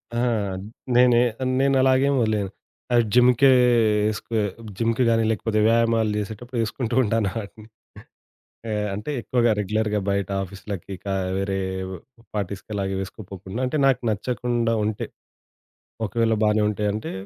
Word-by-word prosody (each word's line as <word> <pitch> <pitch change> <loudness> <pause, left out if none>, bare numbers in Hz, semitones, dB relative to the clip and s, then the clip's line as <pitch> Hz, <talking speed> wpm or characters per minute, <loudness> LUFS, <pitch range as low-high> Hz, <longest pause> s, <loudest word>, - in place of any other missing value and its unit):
ఆ! - - 0 0.8
నేనే 125 -1 +6 0.4
నేను 135 0 +3
అలాగే 130 +1 +4
వదిలేయను. 105 -4 0 0.4
ఆహ్, 120 - +6
జిమ్‌కే 125 +2 +5 0.6
ఏసుకో 110 +2 -6 0.4
జిమ్‌కి 115 +2 +1
గానీ, 115 -1 +3
లేకపోతే 110 0 -1
వ్యాయామాలు 115 -1 +2
చేసేటప్పుడు 115 +4 -5
ఏసుకుంటూ 120 +1 -3
ఉంటాను 110 -2 +1
ఆటిని. 105 +1 -12 1.0
ఆహ్, 105 0 -1
అంటే 105 +9 -5
ఎక్కువగా 120 0 +2
రెగ్యులర్‌గా 105 +1 0
బయట 100 -1 -1
ఆఫీసులకి, 100 0 -7
కా 95 -1 -1 0.2
వేరే 95 0 -1 0.8
పార్టీస్‌కి 100 +1 -4
అలాగే 95 -1 -2
వేసుకోపోకుండా 95 +2 -7
అంటే 150 +3 -1
నాకు 130 -2 +2
నచ్చకుండా 120 +1 -1
ఉంటే. 105 -1 -3 1.0
ఒకవేళ 115 +1 +1
బానే 105 0 +3
ఉంటాయంటే, 105 +1 -2
110 Hz, 120 wpm, -23 LUFS, 100-120 Hz, 1.0 s, నేనే